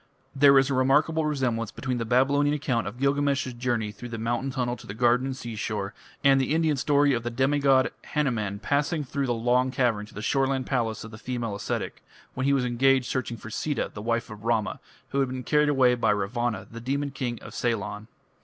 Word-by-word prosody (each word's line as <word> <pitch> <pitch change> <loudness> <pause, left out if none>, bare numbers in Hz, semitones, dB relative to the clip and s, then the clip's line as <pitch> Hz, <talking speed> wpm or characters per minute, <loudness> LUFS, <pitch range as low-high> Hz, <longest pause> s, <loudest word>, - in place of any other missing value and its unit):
There 140 0 +7
is 135 +1 +3
a - - +1
remarkable 150 +5 +2
resemblance 125 -7 -1
between 125 -2 -3
the 115 - -2
Babylonian 140 +5 +3
account 125 -5 -1
of 105 +4 -6
Gilgamesh's 140 -1 +1
journey 120 -3 -1
through 115 +4 -9
the 115 - -5
mountain 120 +4 -1
tunnel 125 -2 -1
to - - -13
the 100 - -6
garden 125 +2 +3
and 130 -1 -4
seashore, 105 -4 -4 0.3
and 135 -1 +5
the 140 +4 0
Indian 160 -2 +2
story 145 +1 +3
of 120 - 0
the 120 - -3
demigod 135 +1 +3 0.2
Hanuman 115 -9 0
passing 145 +7 0
through 140 0 -2
the 120 - +1
long 125 +3 +2
cavern 120 -6 0
to - - -17
the 105 - -6
shoreland 135 0 +1
palace 115 -5 -1
of 110 - -9
the 110 - -10
female 120 -3 -3
ascetic, 100 - -4 0.3
when 130 +1 -1
he - - +4
was 135 -2 +2
engaged 130 +2 +3
searching 125 -3 -2
for 110 +1 -10
Sita, 150 +5 -2
the 105 - -7
wife 115 +1 -1
of 105 -1 -10
Rama, 115 -2 0 0.3
who 140 - -1
had 135 -2 +1
been 130 0 -5
carried 150 +3 +3
away 130 -3 +4
by 115 -2 +1
Ravana, 110 +3 -1
the 115 0 -8
demon 140 +3 -2
king 125 -3 -3
of - - -10
Ceylon. 105 -2 -2
125 Hz, 210 wpm, -26 LUFS, 115-140 Hz, 0.3 s, There